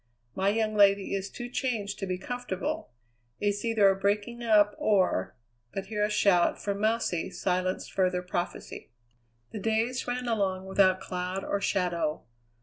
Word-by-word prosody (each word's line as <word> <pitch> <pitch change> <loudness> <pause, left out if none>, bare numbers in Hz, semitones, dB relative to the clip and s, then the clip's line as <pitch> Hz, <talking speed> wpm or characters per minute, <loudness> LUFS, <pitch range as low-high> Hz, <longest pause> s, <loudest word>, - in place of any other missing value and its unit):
My 190 +1 +1
young 215 +1 0
lady 200 -2 +4
is 195 0 -2
too 240 +3 -7
changed 230 -5 -2
to 195 - -3
be 185 -1 -2
comfortable. 245 -2 -4 0.5
It's 205 0 0
either 225 -3 +4
a 195 - +4
breaking 205 +5 -1
up, 210 -2 +4
or 185 - +1 0.2
" 115 0 -44
But 195 - -3
here 210 0 -2
a 210 - +2
shout 200 -4 +3
for 200 - -2
"Mousey," 215 -4 0
silenced 185 0 -2
further 185 -1 +1
prophecy. 175 -1 -5 0.6
The - - -5
days 225 +5 0
ran 250 0 -2
along 195 -4 0
without 190 -1 +3
cloud 185 +1 -4
or 200 - -2
shadow. 175 -6 0
200 Hz, 155 wpm, -28 LUFS, 185-215 Hz, 0.6 s, lady